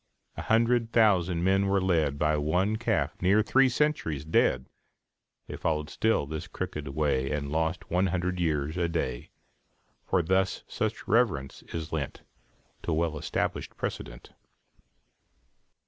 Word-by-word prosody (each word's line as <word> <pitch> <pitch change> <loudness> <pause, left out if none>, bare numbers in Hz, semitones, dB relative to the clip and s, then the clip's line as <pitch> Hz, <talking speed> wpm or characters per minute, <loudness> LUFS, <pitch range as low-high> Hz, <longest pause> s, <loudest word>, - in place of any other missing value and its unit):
A - - -5
hundred 115 +1 +2
thousand 90 -7 +3
men 95 +1 +3
were 100 0 +2
led 80 -7 +1
By 75 +1 +2
one 90 +8 +1
calf 115 - -1
near 100 +4 +4
three 135 +4 +4
centuries 120 - 0
dead. 65 -5 +2 0.8
They - - -7
followed 75 -1 -2
still 110 -9 +1
his 75 +1 -5
crooked 75 -1 -5
way, 70 -2 0
And 70 -1 -3
lost 80 +1 -1
one 90 +2 +2
hundred 90 0 -1
years 80 -1 0
a 85 -1 +1
day; 80 -7 -3 0.8
For 90 - +2
thus 95 +2 +1
such - - -3
reverence 100 - +1
is 80 -1 -5
lent 75 -4 -4 0.6
To - - -3
well 80 0 0
established 75 - -3
precedent. - - -6
85 Hz, 135 wpm, -28 LUFS, 75-95 Hz, 0.8 s, near